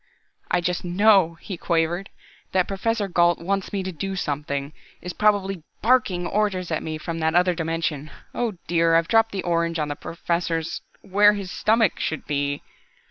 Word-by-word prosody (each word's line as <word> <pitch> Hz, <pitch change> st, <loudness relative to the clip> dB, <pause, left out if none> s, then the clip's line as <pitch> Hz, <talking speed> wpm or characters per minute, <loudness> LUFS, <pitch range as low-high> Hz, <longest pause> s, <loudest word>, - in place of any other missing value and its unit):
"I 180 Hz, -, +2 dB
just 180 Hz, 0 st, -1 dB
know," 185 Hz, -1 st, +4 dB
he 190 Hz, -4 st, -6 dB
quavered, 170 Hz, +3 st, 0 dB, 0.4 s
"that 185 Hz, -1 st, +2 dB
Professor 205 Hz, +1 st, -1 dB
Gault 175 Hz, -2 st, +3 dB
wants 195 Hz, +2 st, -2 dB
me 195 Hz, -2 st, -2 dB
to 185 Hz, -, -4 dB
do 195 Hz, +4 st, -4 dB
something, 145 Hz, -3 st, -3 dB, 0.3 s
is 180 Hz, 0 st, -6 dB
probably 195 Hz, -3 st, +1 dB, 0.2 s
barking 215 Hz, -7 st, +2 dB
orders 190 Hz, -3 st, -1 dB
at 160 Hz, -, 0 dB
me 155 Hz, 0 st, -4 dB
from 165 Hz, +1 st, -5 dB
that 160 Hz, +1 st, +1 dB
other 180 Hz, 0 st, +4 dB
dimension 165 Hz, -3 st, -2 dB, 0.2 s
oh 235 Hz, -3 st, -1 dB
dear, 165 Hz, -1 st, +3 dB
I've 165 Hz, 0 st, +3 dB
dropped 225 Hz, +1 st, +3 dB
the 195 Hz, -, -3 dB
orange 170 Hz, -1 st, 0 dB
on 150 Hz, -2 st, -1 dB
the 145 Hz, -, -3 dB
Professor's 170 Hz, 0 st, -2 dB, 0.2 s
where 205 Hz, +2 st, +5 dB
his 200 Hz, -2 st, -5 dB
stomach 220 Hz, -3 st, +2 dB
should 160 Hz, -, -3 dB
be!" 145 Hz, -1 st, -2 dB
175 Hz, 170 wpm, -24 LUFS, 165-195 Hz, 0.4 s, where